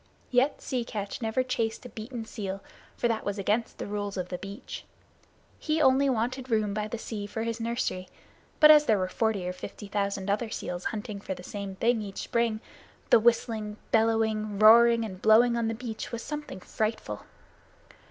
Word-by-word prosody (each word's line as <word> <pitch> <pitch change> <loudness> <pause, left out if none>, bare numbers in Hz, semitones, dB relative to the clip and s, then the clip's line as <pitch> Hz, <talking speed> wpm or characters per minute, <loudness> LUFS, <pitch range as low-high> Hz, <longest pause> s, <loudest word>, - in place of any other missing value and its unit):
Yet 260 +3 +2
Sea 255 -3 -1
Catch 205 -1 -5
never 225 +3 +1
chased 230 -2 -2
a - - -7
beaten 230 +1 -7
seal, 195 -3 -5 0.3
for 240 - +1
that 225 -2 -1
was 205 0 -2
against 210 +4 0
the - - -4
Rules 205 -1 -4
of 180 -1 -3
the 180 - -4
Beach. 200 +5 -8 0.8
He 310 0 0
only 270 -1 +4
wanted 255 +2 -1
room 215 -3 +1
by 210 0 -2
the 235 - -4
sea 210 -2 -5
for 225 +2 -4
his 230 0 -3
nursery. 230 -5 -2 0.5
But 305 0 +10
as 300 -1 +7
there 220 -5 +4
were 185 -1 0
forty 200 -1 -1
or 180 - -2
fifty 200 +3 -8
thousand 200 -1 -2
other 210 +3 0
seals 180 -4 -5
hunting 210 -2 -4
for 190 - -4
the 180 - -11
same 200 0 -6
thing 230 +3 +2
each 200 -2 -7
spring, 230 -2 0 0.5
the - - +8
whistling, 220 -2 +1
bellowing, 220 -2 +2
roaring, 230 +2 +7
and 190 -3 -8
blowing 235 +2 +6
on 235 -1 0
the 225 - -1
beach 225 -2 -6
was 235 -1 -4
something 295 -10 -6
frightful. 215 - -3
220 Hz, 185 wpm, -28 LUFS, 205-235 Hz, 0.8 s, But